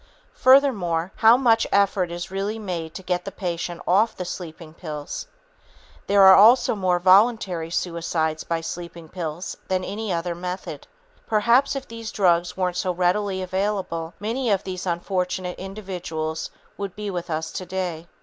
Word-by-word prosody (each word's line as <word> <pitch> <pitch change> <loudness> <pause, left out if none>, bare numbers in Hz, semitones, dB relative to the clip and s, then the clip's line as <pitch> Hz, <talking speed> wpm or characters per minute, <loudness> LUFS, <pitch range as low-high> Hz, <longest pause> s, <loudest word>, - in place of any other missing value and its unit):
Furthermore, 205 -11 +3
how 225 +2 +7
much 230 -4 +3
effort 195 -2 +2
is 175 +1 -6
really 200 +3 -2
made 175 -7 -5
to 190 - -7
get 180 -1 -1
the 195 - -6
patient 175 -3 -4
off 205 +6 +3
the 180 - -4
sleeping 165 -3 -8
pills? 155 - -6 0.8
There 200 0 +5
are 190 0 +10
also 225 +6 +6
more 185 -4 +1
voluntary 185 -2 +3
suicides 165 -2 -1
by 165 -1 -2
sleeping 170 -1 -7
pills 170 -1 -5
than 185 -1 0
by - - -5
any 210 +1 -4
other 170 0 -1
method. 180 +2 -6 0.4
Perhaps 235 +6 +3
if 275 -1 -5
these 230 -1 -7
drugs 175 -3 +2
weren't 180 -1 -1
so 185 0 0
readily 185 +2 0
available, 185 -3 -2
many 230 +4 -2
of 200 -2 +1
these 185 -1 -5
unfortunate 180 +1 -2
individuals 180 -5 -5 0.3
would 200 -2 -4
be 210 -1 -4
with 175 -2 -5
us 160 0 -3
today. 180 -3 -4
185 Hz, 155 wpm, -23 LUFS, 170-205 Hz, 0.8 s, are